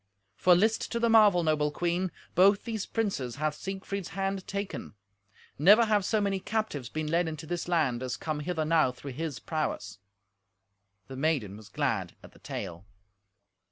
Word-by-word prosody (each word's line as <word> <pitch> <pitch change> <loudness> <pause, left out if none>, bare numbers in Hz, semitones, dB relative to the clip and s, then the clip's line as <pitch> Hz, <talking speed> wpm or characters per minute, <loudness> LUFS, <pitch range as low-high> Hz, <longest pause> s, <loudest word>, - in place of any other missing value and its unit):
For 180 -1 +5
list 220 +5 +1
to 235 - 0
the 235 -1 +2
marvel, 205 -6 +6
noble 155 -2 +2
queen: 175 +3 -1 0.2
both 195 +3 +5
these 225 -3 -4
princes 190 - -2
hath 155 +1 -1
Siegfried's 195 +2 -5
hand 195 0 -2
taken. 200 - -5 0.6
Never 205 +9 +7
have 210 -2 +2
so 215 +3 +1
many 200 -2 0
captives 200 - -3
been 155 0 -3
led 165 +3 +1
into 160 0 -5
this 175 +2 -3
land, 150 -9 +1
as 125 -1 -3
come 155 -2 -3
hither 160 0 -2
now 155 -4 +3
through 135 +2 -9
his 150 +1 -4
prowess." 130 - -3 1.1
The 130 - -8
maiden 135 -9 0
was 105 0 -13
glad - - -1
at - - -13
the - - -20
tale. 90 -1 -6
170 Hz, 165 wpm, -29 LUFS, 150-195 Hz, 1.1 s, Never